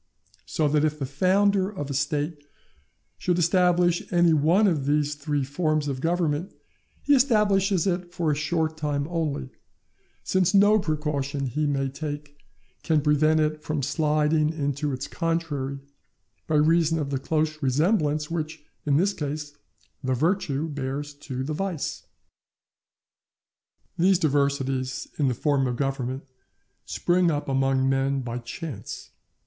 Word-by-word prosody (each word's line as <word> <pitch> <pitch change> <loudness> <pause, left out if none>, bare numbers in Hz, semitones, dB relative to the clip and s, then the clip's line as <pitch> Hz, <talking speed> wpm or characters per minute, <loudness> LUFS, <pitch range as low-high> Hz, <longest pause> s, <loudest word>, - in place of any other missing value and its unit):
So 155 - +1
that 150 +1 +2
if 150 -1 +1
the 140 - -3
founder 190 +7 +2
of 145 -9 -5
a - - -2
State 150 +2 -2 0.8
should 180 -1 +1
establish 175 0 +3
any 175 -2 +4
one 165 +8 +4
of 155 -8 +1
these 150 0 +2
three 145 -1 -2
forms 155 +1 0
of 135 -2 -3
Government, 170 +1 0 0.5
he 290 - +4
establishes 205 - +3
it 180 -2 -1
for 170 -3 0
a - - +1
short 155 +1 -1
time 145 -2 -1
only, 155 - -2 0.7
since 185 +1 +2
no 205 +2 +6
precaution 150 -4 -2
he 150 +4 -1
may 135 -1 0
take 145 +1 -6 0.5
can 155 -2 +2
prevent 155 +1 +3
it 155 0 -1
from 150 -2 -2
sliding 150 +1 +2
into 145 -2 -2
its 130 +1 -4
contrary, 165 -5 -2 0.7
by 155 - 0
reason 165 +1 +3
of 145 -3 -3
the 135 - -1
close 155 +2 -1
resemblance 150 - +1
which, 155 -2 -4 0.2
in 140 -1 +4
this 195 +5 +2
case, 150 -2 -5 0.5
the 130 0 0
virtue 160 -1 0
bears 145 0 -4
to 135 -3 -6
the 150 +3 -3
vice. 175 -2 -3 1.9
These 185 +2 +5
diversities 140 -4 0
in 145 - +3
the 125 - 0
form 140 0 +1
of 125 - -2
Government 135 0 -2 0.6
spring 175 0 +2
up 145 -2 -2
among 135 -1 +2
men 135 0 +1
by 120 -1 -4
chance. 120 - -7
150 Hz, 140 wpm, -25 LUFS, 140-170 Hz, 1.9 s, no